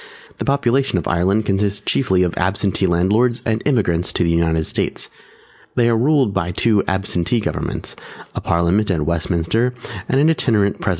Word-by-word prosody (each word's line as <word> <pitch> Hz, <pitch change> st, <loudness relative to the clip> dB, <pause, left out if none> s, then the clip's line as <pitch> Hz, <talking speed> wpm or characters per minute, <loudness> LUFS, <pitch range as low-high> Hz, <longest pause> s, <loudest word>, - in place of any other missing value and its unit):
The -, -, -3 dB
population 135 Hz, -4 st, +1 dB
of 85 Hz, -, -2 dB
Ireland 95 Hz, +5 st, +1 dB
consists 100 Hz, 0 st, 0 dB
chiefly 95 Hz, -3 st, +1 dB
of 90 Hz, -, -2 dB
Absentee 95 Hz, +1 st, 0 dB
landlords 105 Hz, +8 st, +1 dB
and 110 Hz, 0 st, 0 dB
Emigrants 95 Hz, -, +1 dB
to -, -, 0 dB
the 85 Hz, -, +1 dB
United 80 Hz, -1 st, +1 dB
States. -, -, -3 dB, 0.6 s
They 120 Hz, -1 st, +3 dB
are 115 Hz, -, +2 dB
ruled 130 Hz, -2 st, +2 dB
by 90 Hz, -2 st, -2 dB
two 105 Hz, +1 st, +2 dB
Absentee 95 Hz, +2 st, -1 dB
governments, 105 Hz, -, -4 dB, 0.4 s
a -, -, -4 dB
Parliament 85 Hz, +5 st, +1 dB
at 85 Hz, -5 st, 0 dB
Westminster 85 Hz, +9 st, 0 dB, 0.3 s
and 135 Hz, -, +2 dB
an 150 Hz, -, +4 dB
Itinerant 105 Hz, -10 st, +1 dB
President. -, -, -1 dB
100 Hz, 165 wpm, -19 LUFS, 85-115 Hz, 0.6 s, an